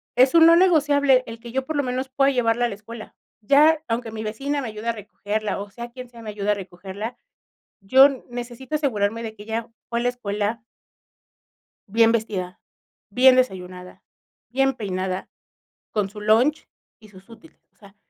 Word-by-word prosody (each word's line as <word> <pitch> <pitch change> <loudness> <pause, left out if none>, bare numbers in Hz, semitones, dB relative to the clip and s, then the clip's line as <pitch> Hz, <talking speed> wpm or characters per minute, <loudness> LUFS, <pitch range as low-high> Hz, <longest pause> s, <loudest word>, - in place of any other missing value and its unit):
es 255 +3 +5
un 325 -1 +8
no 335 - +8
negociable 285 -7 +4
el 230 0 -8
que 235 0 -10
yo 265 +2 -2
por 315 - -4
lo 285 - +1
menos 255 +1 -3
pueda 275 +1 +2
llevarla 240 -2 +1
a - - +2
la 205 - -6
escuela. 220 +2 -11 0.3
Ya 300 +7 +4
aunque 230 0 -3
mi 220 0 -6
vecina 275 +7 -3
me 245 - -5
ayude 215 +2 -8
a - - +4
recogerla, 210 0 -4
o, 205 - -8
sea 235 +3 -8
quien 250 0 -10
sea 235 -1 -13
me 220 - -7
ayude 205 0 -1
a - - +4
recogerla, 195 +4 -7 0.6
yo 265 +8 +7 0.2
necesito 245 +4 -5
asegurarme 230 -6 -1
de 220 -1 -6
que 205 - -12
ella 225 +1 -4 0.2
fue 235 0 -1
la 245 - +1
escuela 215 -1 -3 1.3
bien 225 +2 +4
vestida, 190 -5 -3 0.5
bien 255 +4 +6
desayunada, 180 -6 -3 0.5
bien 270 +1 +1
peinada, 185 -4 -4 0.6
con 205 -3 -1
su 210 0 -10
lunch 230 +8 +2 0.3
y 215 - -16
sus 190 0 -17
útiles. 235 +8 -17
O - - -40
sea, 200 -1 -18
230 Hz, 180 wpm, -23 LUFS, 210-260 Hz, 1.3 s, un